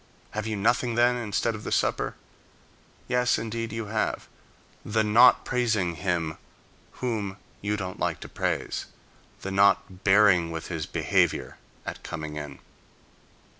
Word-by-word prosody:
Have 110 +1 -3
you 110 - -1
nothing, 120 +3 +1
then, 120 +1 +4
instead 115 -1 -1
of 110 -1 -7
the - - -5
supper? - - 0 0.9
Yes, 125 0 +2
indeed, 115 0 -3
you 115 0 -4
have: 110 +1 -2 0.6
the 110 +1 +1
not 115 +4 +6
praising 110 -8 +1
him, 85 -3 -2 0.7
whom 105 -5 -2 0.2
you 105 +1 -1
don't 95 -2 -5
like - - -1
to - - -7
praise; - - -2 0.6
the 95 - -3
not 95 -1 +3
bearing 95 -4 +5
with 80 -1 -5
his 80 -4 -3
behavior - - +1 0.3
at - - -6
coming 75 -2 -6
in. 75 -2 -6
105 Hz, 135 wpm, -27 LUFS, 90-115 Hz, 0.9 s, not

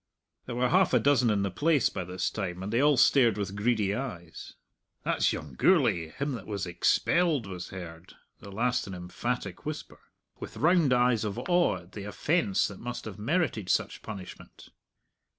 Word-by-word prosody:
There 120 - -4
were 125 +1 +1
half 185 -6 +3
a - - +5
dozen 125 -1 +3
in 100 -2 +1
the 100 - -1
place 145 - +2
by 90 - -4
this 90 0 -2
time, 95 -3 -4
and 105 +3 -4
they 120 - +3
all 145 -1 +4
stared 120 -4 +5
with 100 -1 -3
greedy 105 -2 +1
eyes. 95 -10 -7 0.5
"That's - - +1
young 75 -4 -6
Gourlay 80 +5 +3
him 140 - -3
that 115 -7 -6
was 100 -3 -3
expelled," 150 - +1
was 90 -2 -7
heard, 85 -2 -10 0.2
the 100 - -11
last 120 +3 0
an 95 - -6
emphatic 90 +3 -4
whisper, 150 0 -6 0.4
with - - -8
round 165 -3 +3
eyes 125 -2 +3
of 105 -2 -3
awe 175 - +2
at 90 +2 -19
the 100 -1 -7
offence 105 - +1
that 100 - -10
must 120 +1 -6
have 105 -2 -8
merited 115 - -1
such - - 0
punishment. 100 -4 -10
110 Hz, 180 wpm, -28 LUFS, 95-130 Hz, 0.5 s, a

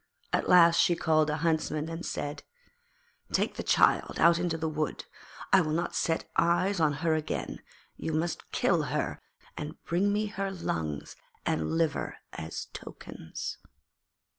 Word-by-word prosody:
At - - +1
last 170 -2 +7
she 175 - +4
called 155 -2 +2
a 150 - 0
Huntsman, 155 -1 0
and 165 +1 -5
said: 145 +1 -4 0.9
'Take - - +1
the - - -4
child - - +3
out 170 0 +6
into 170 -2 0
the 160 0 -2
wood; 155 -2 -2 0.5
I 190 - +8
will 155 -2 -1
not 170 +2 -1
set 165 -1 0
eyes 175 +3 +2
on 155 -2 +4
her 160 - +4
again; 155 -1 -3 0.4
you 160 - -3
must 160 +2 -2
kill - - +2
her - - -2 0.3
and 150 +2 -6
bring 190 +4 +1
me 210 +1 +1
her 195 -1 -3
lungs 80 - -3 0.3
and 80 -1 0
liver 165 -3 0 0.2
as 80 +1 -5
tokens.' 80 - -7
165 Hz, 150 wpm, -29 LUFS, 155-175 Hz, 0.9 s, I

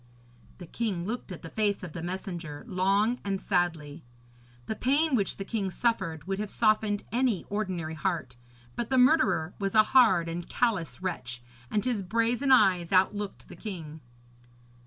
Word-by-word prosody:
"' 120 0 -27
The 180 - -9
king 190 -1 -3
looked 225 -1 -4
at 180 - -8
the 165 - -8
face 205 -3 0
of 170 -4 -7
the 170 - -5
messenger 175 -3 -5
long 200 +4 +2
and 195 -1 -2
sadly. 165 -5 -1 0.6
The 220 - -3
pain 285 +6 +2
which 205 -6 +1
the 195 - -5
king 200 -3 -2
suffered 190 -8 -1
would 195 +1 -2
have 210 -1 -3
softened 215 -2 +2
any 240 -5 +1
ordinary 185 -6 -2
heart; 160 -6 -2 0.4
but 235 - -3
the 260 - +2
murderer 230 - +4
was 195 +1 -2
a 215 - +8
hard 190 -10 +6
and 170 +1 -5
callous 200 -8 -1
wretch, 125 -10 -4 0.3
and 210 - 0
his 240 -5 0
brazen 230 +7 +1
eyes 180 -9 +4
outlooked 195 +2 +1
the - - -11
king. 160 -7 -7
195 Hz, 165 wpm, -28 LUFS, 170-225 Hz, 0.6 s, a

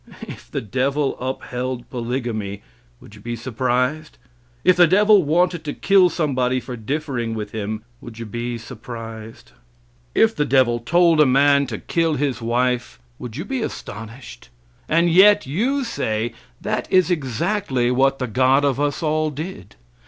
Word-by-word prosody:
If - - -10
the - - -3
devil 135 +6 -1
upheld 125 -1 -4
polygamy 115 -5 -4 0.4
would - - -16
you 105 - -14
be 120 +2 -4
surprised? 125 +5 -2 0.5
If 185 - +5
the 175 -1 +7
devil 205 +3 +5
wanted 175 +2 +1
to 145 - -3
kill 195 -2 +4
somebody 130 -6 0
for 125 0 -7
differing 120 -1 -3
with 105 -1 -5
him 110 0 -4 0.2
would 115 -2 -11
you 115 - -6
be 120 +2 -4
surprised? 115 - -9 0.6
If 225 0 +4
the 150 - +1
devil 130 -3 +2
told 165 +5 +3
a - - +6
man 140 +1 +4
to 115 -4 -4
kill 165 +4 0
his 135 -4 -1
wife, 120 - -1 0.2
would 120 0 -7
you 165 - -4
be 265 +2 -3
astonished? 110 - -8 0.4
And 170 +2 +3
yet, 200 +5 +6
you 240 - 0
say, 115 - -2 0.3
that - - -3
is 185 -1 +4
exactly 135 - 0
what 135 +2 +2
the 130 - -2
God 130 +4 +3
of 135 -1 0
us 145 +2 -1
all 155 0 +1
did. 150 - -8
130 Hz, 155 wpm, -21 LUFS, 120-155 Hz, 0.6 s, the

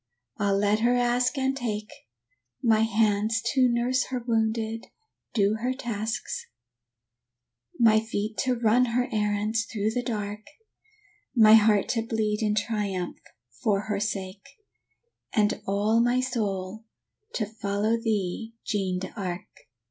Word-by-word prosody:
Ah, 205 - +1
let 205 +2 +2
her 240 +2 +3
ask 245 +2 +1
and 265 0 +1
take; 215 -5 -4 0.7
My 225 -2 +4
hands 220 0 +2
to 255 -2 +4
nurse 245 +2 +1
her 255 -1 -3
wounded, 225 -1 -1 0.5
do 205 0 +2
her 250 +3 -1
tasks, 225 -3 -4 1.3
My 220 -2 +6
feet 215 -1 -3
to 255 -1 +1
run 235 +2 +3
her 245 +1 0
errands 210 +1 0
through 215 -1 0
the 245 +2 -1
dark, 210 -3 -3 1.0
My 220 -2 +7
heart 215 -2 +5
to 230 - +1
bleed 220 -2 -1
in 210 -1 +1
triumph 205 -4 -2 0.4
for 200 -2 +2
her 210 -1 -2
sake, 200 +2 -4 0.8
And 215 0 +2
all 205 +3 +2
my 245 +1 +2
soul 215 -5 -2 0.5
to 215 - -1
follow 210 +1 -1
thee, 225 0 -2
Jeanne 195 -4 -1
d'Arc!" 185 -1 -5
220 Hz, 125 wpm, -26 LUFS, 205-235 Hz, 1.3 s, My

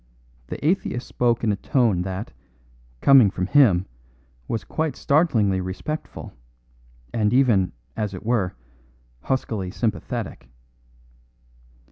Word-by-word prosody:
The - - -5
atheist 155 -7 0
spoke 120 -1 0
in 110 - +2
a - - +1
tone 110 -3 +1
that, 95 - -5 0.7
coming 135 -7 +7
from 90 -1 -3
him, 100 -6 +4 0.6
was 115 - -2
quite 160 -2 -2
startlingly 115 - +2
respectful, 95 +12 -6 0.8
and 105 -2 +1
even, 115 -9 +3 0.2
as 105 -3 -3
it 90 - -9
were, 105 -6 0 0.7
huskily 110 -8 -2
sympathetic. 110 - -4
110 Hz, 105 wpm, -23 LUFS, 95-125 Hz, 0.8 s, coming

